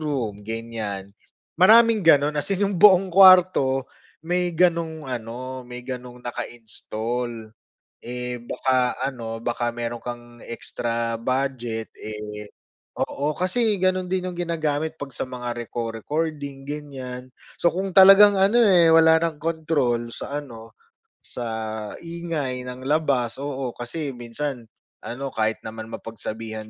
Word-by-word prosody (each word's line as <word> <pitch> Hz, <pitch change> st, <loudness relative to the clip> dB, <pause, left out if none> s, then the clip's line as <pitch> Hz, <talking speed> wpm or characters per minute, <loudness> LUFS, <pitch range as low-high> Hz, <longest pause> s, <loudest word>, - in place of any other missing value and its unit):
room 130 Hz, -9 st, -2 dB
ganyan, 110 Hz, -4 st, -5 dB, 0.5 s
maraming 225 Hz, +3 st, +7 dB
gano'n 150 Hz, -4 st, +4 dB
as -, -, -2 dB
in 200 Hz, +1 st, +1 dB
yung 195 Hz, -1 st, -1 dB
buong 190 Hz, -2 st, +6 dB
kuwarto 180 Hz, -8 st, +6 dB, 0.4 s
may 180 Hz, +1 st, +1 dB
ganong 165 Hz, -2 st, +1 dB
ano, 130 Hz, +1 st, -5 dB
may 125 Hz, 0 st, -8 dB
ganong 125 Hz, -1 st, -8 dB
naka-install. 115 Hz, -1 st, -4 dB, 0.5 s
Eh, 125 Hz, 0 st, -5 dB
baka 125 Hz, 0 st, 0 dB
ano 120 Hz, -4 st, -4 dB
baka 120 Hz, +1 st, -1 dB
mayro'n 120 Hz, 0 st, -5 dB
kang 120 Hz, -1 st, -8 dB
extra 115 Hz, 0 st, -3 dB
budget, 120 Hz, -3 st, -2 dB
eh, 105 Hz, -1 st, -7 dB, 0.5 s
oo 145 Hz, +2 st, -1 dB
kasi 205 Hz, +3 st, +1 dB
gano'n 185 Hz, 0 st, +1 dB
din 185 Hz, -1 st, 0 dB
yung 180 Hz, -, -5 dB
ginagamit 160 Hz, -2 st, -2 dB
'pag 140 Hz, -3 st, -7 dB
sa -, -, -2 dB
mga 125 Hz, -1 st, -4 dB
reco-recording 135 Hz, +5 st, -4 dB
ganyan. 130 Hz, -4 st, -7 dB, 0.3 s
So 170 Hz, -, +5 dB
kung 190 Hz, +1 st, -3 dB
talagang 195 Hz, +1 st, +9 dB
ano, 195 Hz, +4 st, +3 dB
eh, 185 Hz, -7 st, +6 dB
wala 160 Hz, 0 st, +6 dB
ng 165 Hz, -2 st, -1 dB
kontrol 145 Hz, -7 st, 0 dB
sa 145 Hz, +4 st, -4 dB
ano, 115 Hz, -4 st, -12 dB, 0.5 s
sa 120 Hz, -, -5 dB, 0.5 s
ingay 165 Hz, -7 st, -4 dB
ng 130 Hz, +1 st, -8 dB
labas, 140 Hz, -6 st, +1 dB
oo, 135 Hz, -3 st, -4 dB
kasi 135 Hz, +3 st, -4 dB
minsan 120 Hz, +1 st, -4 dB, 0.4 s
ano 135 Hz, +3 st, -5 dB
kahit 110 Hz, 0 st, 0 dB
naman 110 Hz, 0 st, -7 dB
mapagsabihan 110 Hz, 0 st, -6 dB
130 Hz, 125 wpm, -23 LUFS, 120-165 Hz, 0.5 s, talagang